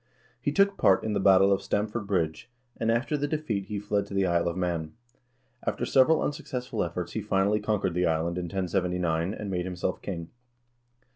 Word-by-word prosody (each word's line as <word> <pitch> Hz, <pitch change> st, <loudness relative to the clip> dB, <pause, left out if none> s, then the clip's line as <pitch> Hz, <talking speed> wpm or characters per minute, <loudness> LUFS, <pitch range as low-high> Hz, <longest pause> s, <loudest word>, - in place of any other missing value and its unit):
He -, -, 0 dB
took 200 Hz, 0 st, +3 dB
part 95 Hz, -, +4 dB
in 110 Hz, -, -1 dB
the -, -, +1 dB
battle 95 Hz, 0 st, +6 dB
of 95 Hz, -, 0 dB
Stamford 105 Hz, +1 st, -2 dB
Bridge, 85 Hz, +2 st, -1 dB, 0.3 s
and 115 Hz, -, -1 dB
after 120 Hz, +6 st, 0 dB
the 145 Hz, 0 st, -1 dB
defeat 145 Hz, -11 st, -2 dB
he 105 Hz, +1 st, -4 dB
fled 105 Hz, 0 st, -1 dB
to 100 Hz, -, -7 dB
the 95 Hz, -1 st, +3 dB
Isle 85 Hz, -1 st, +1 dB
of 85 Hz, +1 st, -2 dB
Man. 85 Hz, -4 st, -2 dB, 0.7 s
After -, -, -1 dB
several 145 Hz, +4 st, +4 dB
unsuccessful 130 Hz, -4 st, -3 dB
efforts -, -, -4 dB
he -, -, -3 dB
finally 100 Hz, +2 st, +2 dB
conquered 105 Hz, -5 st, 0 dB
the 90 Hz, +1 st, +1 dB
island 85 Hz, +2 st, 0 dB
in 90 Hz, -, -3 dB
1079, 90 Hz, -1 st, -1 dB
and 105 Hz, -2 st, -5 dB
made 90 Hz, -1 st, -1 dB
himself 90 Hz, -1 st, -3 dB
king. 85 Hz, -4 st, -5 dB
95 Hz, 190 wpm, -27 LUFS, 90-110 Hz, 0.7 s, battle